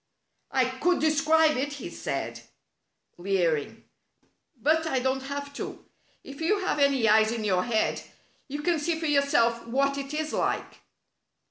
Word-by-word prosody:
"I 260 -1 +2
could 260 +8 0
describe 315 -1 +3
it," 285 +3 -2
he 285 - -7
said, - - -4 0.8
leering, 175 -5 -1 0.8
"but 320 +5 +2
I 270 - 0
don't 260 +1 0
have 285 +1 -6
to. - - -7 0.4
If 275 +2 -10
you 400 +5 +1
have 365 -5 -1
any 275 -5 +3
eyes 215 0 +5
in 230 -2 -3
your 185 -3 +1
head 225 -3 0 0.5
you 290 +1 -5
can 340 -1 +1
see 320 +2 -1
for 325 - -3
yourself 280 -6 +2
what 275 +3 +1
it 275 0 -6
is 310 0 -3
like." - - -2
280 Hz, 150 wpm, -27 LUFS, 235-310 Hz, 0.8 s, eyes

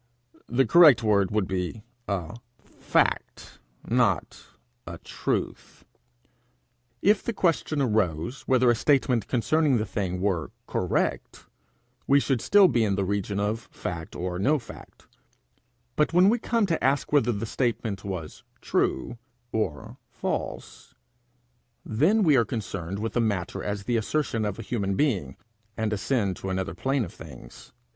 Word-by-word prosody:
The 130 +2 +2
correct 150 -2 +7
word 100 -3 +3
would 105 -3 0
be 95 +3 -3 0.2
a 95 -2 -3 0.3
fact, - - -1 0.3
not - - 0 0.4
a 85 0 -6
truth. - - -4 1.2
If 205 +2 +4
the 235 - -3
question 155 - 0
arose 105 - -1
whether 130 -2 +4
a - - +2
statement 125 -3 +2
concerning 140 +2 +2
the 110 - -1
thing 95 -3 -3
were 90 -4 -1 0.2
correct, - - -2 0.6
we 140 +1 +5
should 135 -4 0
still 200 +5 +6
be 120 -9 +2
in 100 -2 +1
the 95 0 -1
region 100 +1 -2
of 105 +2 -1
fact 80 -2 -6
or 90 0 -3
no 145 +10 +3
fact; 115 -5 -13 0.9
but 150 +2 +1
when 180 +3 +6
we 235 +3 +2
come 230 -1 +1
to 170 -4 -1
ask 140 +2 +1
whether 125 -5 +4
the 105 0 -3
statement 110 -4 -2
was 90 -6 -6 0.2
true 115 - -1 0.3
or 110 - -3
false, 120 - -5 0.9
then 165 - +2
we 155 -5 +5
are 120 - +5
concerned 95 -5 -5
with 110 +2 -3
the 120 - +1
matter 100 -6 -2
as 100 -1 -3
the 120 +2 0
assertion 115 -1 -1
of 105 -2 -3
a 115 - -7
human 100 -4 -2
being, 95 - 0 0.4
and 110 -1 -1
ascend 105 -2 -1
to 95 - -6
another 95 -3 -2
plane 130 +6 -1
of 85 - -11
things. - - -13
110 Hz, 145 wpm, -26 LUFS, 95-135 Hz, 1.2 s, correct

